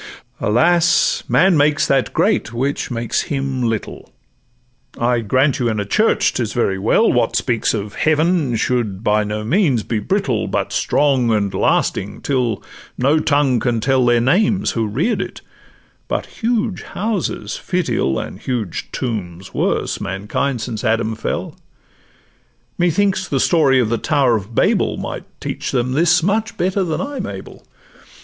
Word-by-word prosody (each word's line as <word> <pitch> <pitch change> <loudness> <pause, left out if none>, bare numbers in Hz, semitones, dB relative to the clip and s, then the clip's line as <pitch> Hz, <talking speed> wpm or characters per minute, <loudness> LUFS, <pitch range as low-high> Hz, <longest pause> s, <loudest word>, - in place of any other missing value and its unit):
Alas! 170 +9 +3
man 185 -1 +4
makes 150 0 +3
that 135 -2 +1
great - - +1
which 135 +4 -2
makes 120 -2 -1
him 135 -2 -2
little: 115 -2 -3 0.9
I 120 0 +1
grant 130 +5 +1
you 120 -2 +1
in 110 -2 -1
a 105 - -2
church 215 - +2
'tis 115 -4 -2
very 95 -5 0
well: 115 - +3
What 120 -2 +1
speaks 115 -2 0
of 105 -1 -5
Heaven 155 -4 +1
should 110 -4 -1
by 105 -1 +2
no 105 +1 -3
means 135 - +2
be 115 - -2
brittle, 145 - -1
But - - -2
strong 135 -5 +2
and 100 -3 0
lasting, 100 +2 0
till 125 -6 -1 0.3
no 140 +5 +3
tongue 145 -5 +2
can 120 -1 0
tell 130 +3 +2
Their 120 -1 +4
names 190 - +2
who 115 -2 -1
rear'd 145 - 0
it; - - -7 0.7
but - - -2 0.2
huge 225 -4 0
houses 210 -1 -3
fit 180 -3 -2
ill— 65 - 0
And - - -6
huge 115 -9 -4
tombs 95 -7 -5
worse—mankind, 105 +6 -2
since 115 -1 -5
Adam 115 -1 +1
fell: 110 - -4 1.2
Methinks 185 +2 +1
the 135 - 0
story 140 -4 +3
of 120 -4 +1
the 115 - 0
tower 130 -5 +2
of 110 +2 -5
Babel - - +2
Might - - -5
teach - - -4
them 125 -1 0
this 170 +4 +3
much 215 +4 0
better 190 +2 0
than 165 -4 -2
I'm 280 0 -4
able. - - -9
130 Hz, 150 wpm, -19 LUFS, 110-165 Hz, 1.2 s, man